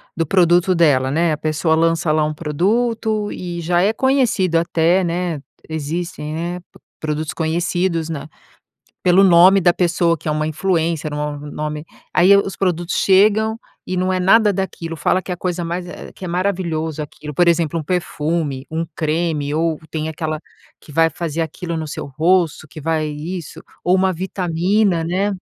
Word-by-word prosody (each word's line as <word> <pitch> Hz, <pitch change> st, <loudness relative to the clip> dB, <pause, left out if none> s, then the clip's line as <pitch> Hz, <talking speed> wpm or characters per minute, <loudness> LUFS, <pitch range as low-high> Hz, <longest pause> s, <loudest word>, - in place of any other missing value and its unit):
do 165 Hz, -, 0 dB
produto 175 Hz, +2 st, +3 dB
dela, 140 Hz, -6 st, +3 dB
né. 165 Hz, +2 st, +2 dB
A 150 Hz, -, -2 dB
pessoa 155 Hz, +1 st, 0 dB
lança 165 Hz, +1 st, +1 dB
lá 155 Hz, 0 st, +2 dB
um 155 Hz, 0 st, -1 dB
produto, 215 Hz, +7 st, 0 dB
e 175 Hz, -1 st, -5 dB
já 175 Hz, +1 st, +1 dB
é 200 Hz, -, +3 dB
conhecido 245 Hz, -11 st, +2 dB
até, 170 Hz, +2 st, +2 dB
né, 170 Hz, -3 st, -2 dB, 0.3 s
existem 160 Hz, 0 st, -4 dB, 0.2 s
eh, -, -, -6 dB, 0.4 s
produtos 155 Hz, 0 st, -2 dB
conhecidos 170 Hz, +1 st, -1 dB
na 155 Hz, -2 st, -5 dB, 0.7 s
pelo 180 Hz, +2 st, +5 dB
nome 185 Hz, +1 st, +7 dB
da 175 Hz, -1 st, +4 dB
pessoa, 170 Hz, -2 st, +1 dB
que 160 Hz, -, -16 dB
é 155 Hz, -, +1 dB
uma 155 Hz, 0 st, -1 dB
influencer, 160 Hz, -2 st, -1 dB
um -, -, -3 dB
ou 150 Hz, 0 st, -3 dB
nome. 150 Hz, +1 st, -5 dB, 0.3 s
Aí, 190 Hz, +3 st, +6 dB
os 195 Hz, -2 st, -1 dB
produtos 175 Hz, -1 st, -1 dB
chegam 215 Hz, +3 st, +3 dB, 0.3 s
e 185 Hz, -, -3 dB
não 185 Hz, +1 st, +1 dB
é 185 Hz, -, +1 dB
nada 205 Hz, +3 st, +5 dB
daquilo, 170 Hz, -3 st, -4 dB
fala 185 Hz, +4 st, +1 dB
que 185 Hz, -, -9 dB
é -, -, 0 dB
a -, -, -11 dB
coisa 175 Hz, -1 st, -3 dB
mais 175 Hz, +2 st, -3 dB
eh, 175 Hz, -, -9 dB
que -, -, -10 dB
é 180 Hz, -, -4 dB
maravilhoso 170 Hz, -4 st, -2 dB
aquilo, 150 Hz, +1 st, -8 dB
por 175 Hz, +5 st, +3 dB
exemplo, 165 Hz, -1 st, +1 dB
um 155 Hz, -, -5 dB
perfume, 155 Hz, -4 st, -2 dB
um 160 Hz, +1 st, -1 dB
creme, 155 Hz, -2 st, -1 dB
ou, 160 Hz, -1 st, 0 dB
tem 155 Hz, -1 st, -2 dB
aquela, 155 Hz, 0 st, -3 dB, 0.4 s
que -, -, -16 dB
vai 165 Hz, +2 st, +4 dB
fazer 165 Hz, 0 st, -4 dB
aquilo 165 Hz, +2 st, -4 dB
no 160 Hz, -1 st, -3 dB
seu 145 Hz, -, -5 dB
rosto, 160 Hz, +2 st, +1 dB
que 155 Hz, -, -10 dB
vai 155 Hz, 0 st, 0 dB
isso, 160 Hz, +4 st, -6 dB, 0.2 s
ou 180 Hz, -, +3 dB
uma 190 Hz, 0 st, +2 dB
vitamina 180 Hz, +1 st, 0 dB
né. 195 Hz, +4 st, 0 dB
170 Hz, 175 wpm, -19 LUFS, 155-185 Hz, 0.7 s, nome